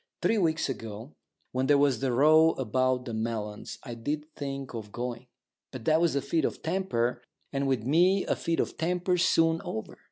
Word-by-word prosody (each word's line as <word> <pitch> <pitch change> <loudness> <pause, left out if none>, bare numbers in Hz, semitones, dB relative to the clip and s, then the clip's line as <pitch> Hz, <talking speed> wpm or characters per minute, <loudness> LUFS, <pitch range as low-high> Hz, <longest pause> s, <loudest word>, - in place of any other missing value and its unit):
Three 225 - +3
weeks 160 -3 +1
ago, 115 0 -6 0.4
when 130 +1 0
there 145 0 +5
was 140 -5 +3
that 135 -1 0
row 155 +5 +5
about 130 +1 0
the 120 - -5
melons, 110 -2 -4
I 120 - -6
did 145 +6 -3
think 135 -2 -5
of 110 -3 -7
going. 120 +1 -5 0.4
But 130 -4 -8
that 160 +1 +4
was 170 -4 +2
a 140 - 0
fit 160 +3 0
of - - -2
temper, 160 -9 -1 0.3
and 140 0 0
with 130 -5 0
me 180 - +3
a - - 0
fit 165 -1 -1
of - - -2
temper's 180 +1 +1
soon 165 0 +3
over. 110 0 -6
135 Hz, 190 wpm, -28 LUFS, 120-160 Hz, 0.4 s, there